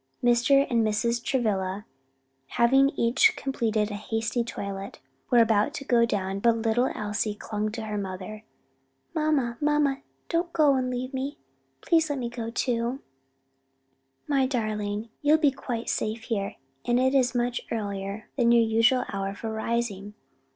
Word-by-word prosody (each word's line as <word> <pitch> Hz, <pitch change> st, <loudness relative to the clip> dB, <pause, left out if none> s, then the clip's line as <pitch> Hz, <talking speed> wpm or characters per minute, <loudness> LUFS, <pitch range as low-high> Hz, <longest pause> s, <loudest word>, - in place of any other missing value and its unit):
Mr. 245 Hz, +3 st, +4 dB
and 235 Hz, -2 st, +2 dB
Mrs. 230 Hz, +2 st, 0 dB
Travilla, 205 Hz, -6 st, -1 dB, 0.7 s
having 270 Hz, +3 st, +5 dB
each 235 Hz, +1 st, +3 dB
completed 225 Hz, -5 st, -1 dB
a -, -, -4 dB
hasty 225 Hz, +3 st, -2 dB
toilet, 200 Hz, -3 st, -6 dB, 0.3 s
were 245 Hz, -, +4 dB
about 225 Hz, +4 st, +3 dB
to 280 Hz, -, -6 dB
go 235 Hz, -2 st, +3 dB
down; 195 Hz, -2 st, -2 dB
but 230 Hz, +2 st, +3 dB
little 225 Hz, +3 st, +1 dB
Elsie 210 Hz, 0 st, -2 dB
clung 215 Hz, 0 st, -3 dB
to 225 Hz, 0 st, -5 dB
her 210 Hz, -1 st, -3 dB
mother. 195 Hz, +2 st, -6 dB, 0.7 s
"Mamma, 300 Hz, -7 st, 0 dB
mamma, 295 Hz, -2 st, +2 dB, 0.3 s
don't 340 Hz, +1 st, -1 dB
go 300 Hz, -3 st, +4 dB
and 255 Hz, -1 st, 0 dB
leave 255 Hz, +2 st, -4 dB
me! 270 Hz, +2 st, -3 dB, 0.4 s
please 325 Hz, -2 st, +2 dB
let 290 Hz, -, -1 dB
me 240 Hz, -2 st, -3 dB
go 235 Hz, -1 st, -5 dB
too." 240 Hz, +2 st, -1 dB, 1.2 s
"My 275 Hz, -3 st, +2 dB
darling, 215 Hz, -3 st, -2 dB
you 295 Hz, +1 st, +4 dB
would 315 Hz, -, +4 dB
be 290 Hz, -3 st, +5 dB
quite 245 Hz, -3 st, -5 dB
safe 220 Hz, +1 st, -2 dB
here; 205 Hz, -4 st, -2 dB, 0.3 s
and 240 Hz, 0 st, +2 dB
it 260 Hz, +1 st, +2 dB
is 260 Hz, -2 st, +2 dB
much 240 Hz, 0 st, 0 dB
earlier 200 Hz, -1 st, -4 dB
than 235 Hz, -2 st, +4 dB
your 235 Hz, -1 st, +6 dB
usual 230 Hz, +3 st, +3 dB
hour 195 Hz, 0 st, -3 dB
for 220 Hz, +2 st, -5 dB
rising." 220 Hz, -3 st, -2 dB
235 Hz, 155 wpm, -26 LUFS, 210-260 Hz, 1.2 s, your